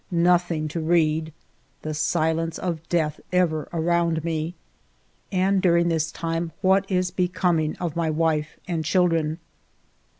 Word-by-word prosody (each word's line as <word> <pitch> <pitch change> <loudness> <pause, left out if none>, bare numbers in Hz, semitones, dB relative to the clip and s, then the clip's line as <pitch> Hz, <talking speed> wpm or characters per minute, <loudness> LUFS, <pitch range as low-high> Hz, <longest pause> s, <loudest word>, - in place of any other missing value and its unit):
Nothing 175 -2 +2
to 165 - -3
read! 160 -1 +1 0.5
The 155 - -3
silence 160 +1 0
of 170 -4 -3
death 155 -4 0
ever 165 -4 +1
around 170 -1 +1
me! 165 +1 -2 0.8
And 190 0 +2
during 170 -1 +3
this 160 -1 0
time 165 0 -3
what 190 +1 +3
is 180 -1 0
becoming 175 -3 0
of 170 -3 -3
my 165 -1 0
wife 155 -1 0
and 170 -3 -1
children 165 -2 +1
165 Hz, 130 wpm, -24 LUFS, 160-175 Hz, 0.8 s, during